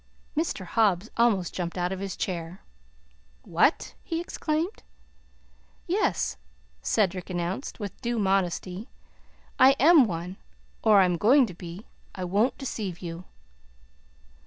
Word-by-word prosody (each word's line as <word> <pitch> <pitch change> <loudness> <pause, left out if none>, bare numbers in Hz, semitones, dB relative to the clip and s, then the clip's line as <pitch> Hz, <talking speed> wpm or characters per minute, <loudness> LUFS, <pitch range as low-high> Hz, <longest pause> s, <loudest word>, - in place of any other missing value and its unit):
Mr. 300 - -1
Hobbs 205 0 +1
almost 220 -7 +2
jumped 175 0 -4
out 180 +1 0
of 190 - -4
his 195 -1 -4
chair. 175 -1 -4 0.8
"What!" 175 - +1
he 330 -1 -3
exclaimed. 335 +2 -2 1.0
"Yes," 380 +5 0 0.4
Cedric 190 -4 0
announced, 180 +9 -3
with 205 -4 -7
due 240 -1 -1
modesty; 190 +1 -1 0.7
"I 265 +1 +8
am 310 -2 +7
one 180 -1 -5 0.4
or 210 -3 +6
I - - +5
am 180 -1 0
going 255 - +5
to 190 - -8
be. 175 +4 -9 0.3
I 185 - -4
won't 205 +8 +1
deceive 215 -9 -4
you." 170 +1 -6
195 Hz, 125 wpm, -27 LUFS, 180-240 Hz, 1.0 s, I